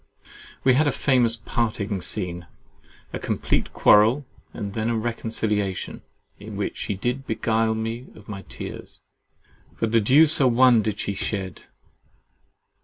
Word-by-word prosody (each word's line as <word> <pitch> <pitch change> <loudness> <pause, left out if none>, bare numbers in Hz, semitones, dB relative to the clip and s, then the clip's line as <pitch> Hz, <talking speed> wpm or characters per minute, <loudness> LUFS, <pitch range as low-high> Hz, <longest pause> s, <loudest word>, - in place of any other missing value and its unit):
We 130 - +5
had 145 +4 +3
a - - +3
famous 125 -5 +2
parting 110 -4 -2
scene, 90 -2 -3 0.7
a - - -3
complete - - -1
quarrel 115 +7 +4 0.3
and 100 -1 -6
then 110 +1 -1
a 115 - 0
reconciliation, 110 -4 -2 0.4
in - - -9
which - - -3
she 100 - -3
did 125 +7 -3
beguile 110 0 0
me 115 +3 -4
of 105 - -15
my 100 -2 -6
tears, - - -7 0.8
but 115 -1 0
the 115 -1 +4
deuce 145 +8 +6
a 135 - +5
one 125 -1 +5
did 105 -1 -2
she 100 - -3
shed. 95 -2 -4
110 Hz, 140 wpm, -24 LUFS, 105-125 Hz, 0.8 s, deuce